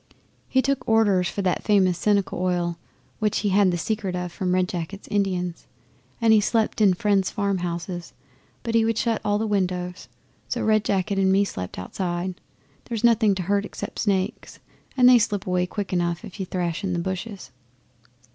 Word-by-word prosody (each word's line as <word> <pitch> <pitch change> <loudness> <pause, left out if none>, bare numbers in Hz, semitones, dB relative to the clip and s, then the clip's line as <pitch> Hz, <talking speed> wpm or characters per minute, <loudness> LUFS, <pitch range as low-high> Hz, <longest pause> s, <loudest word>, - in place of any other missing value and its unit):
He 260 0 +3
took 275 -3 -1
orders 205 -5 +3
for 200 - -3
that 180 -1 0
famous 190 -4 +3
Seneca 200 +2 +1
Oil 175 -2 -1 0.4
which 210 -1 0
he 205 - +1
had 195 0 +4
the 175 - 0
secret 200 0 -2
of 180 -1 -3
from 180 +1 -1
Red 185 0 +2
Jacket's 180 +3 -6
Indians, 185 -4 -1 0.5
and 225 -1 +5
he 215 - +6
slept 220 +1 0
in 195 -3 +5
friends' 200 -2 +1
farmhouses, 175 -3 -3 0.5
but 230 - -3
he 230 -1 +4
would 225 0 0
shut 230 -2 0
all 205 -1 +1
the 220 - -1
windows; 180 -3 -2 0.4
so - - -2
Red 215 -1 +3
Jacket 195 0 0
and 190 -1 +3
me 200 +1 +4
slept 90 - -6
outside. 175 - -4 0.4
There's 230 -2 -4
nothing 225 -4 +4
to 185 - -3
hurt 200 +3 +1
except - - -7
snakes 195 +1 -1 0.4
and 250 -1 +7
they 250 -1 +8
slip 205 -3 -1
away 180 -1 0
quick 200 0 -4
enough 175 -1 -1
if 195 - -11
you 190 - -3
thrash 175 -2 -2
in 190 -2 -1
the - - -1
bushes. 190 - -5
195 Hz, 185 wpm, -24 LUFS, 180-210 Hz, 0.5 s, they